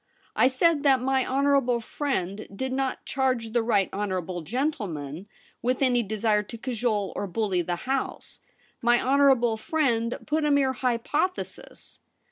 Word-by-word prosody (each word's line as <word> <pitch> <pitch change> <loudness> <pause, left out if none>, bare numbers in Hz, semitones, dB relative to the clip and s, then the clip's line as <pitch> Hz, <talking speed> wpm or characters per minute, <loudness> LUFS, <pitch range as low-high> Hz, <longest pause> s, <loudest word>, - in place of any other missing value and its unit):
I - - +5
said 290 +4 +2
that 275 -3 +4
my 265 +1 +1
honourable 270 -2 +2
friend 215 -6 -3
did 260 +5 -3
not 265 0 -2
charge 255 -4 -1
the 240 +1 +2
right 205 -4 +2
honourable 185 -3 -3
gentleman 190 - -3 0.3
with 250 +3 0
any 245 -2 +3
desire 215 0 +1
to 220 +3 -9
cajole 225 -5 -1
or 200 - -3
bully 190 -1 0
the 175 +1 -2
House. 265 +1 -3 0.4
My 240 0 +4
honourable 260 -4 +3
friend 235 -3 0
put 310 +1 0
a 300 - +2
mere 280 -2 +3
hypothesis.' 260 +9 -3
240 Hz, 140 wpm, -26 LUFS, 210-270 Hz, 0.4 s, I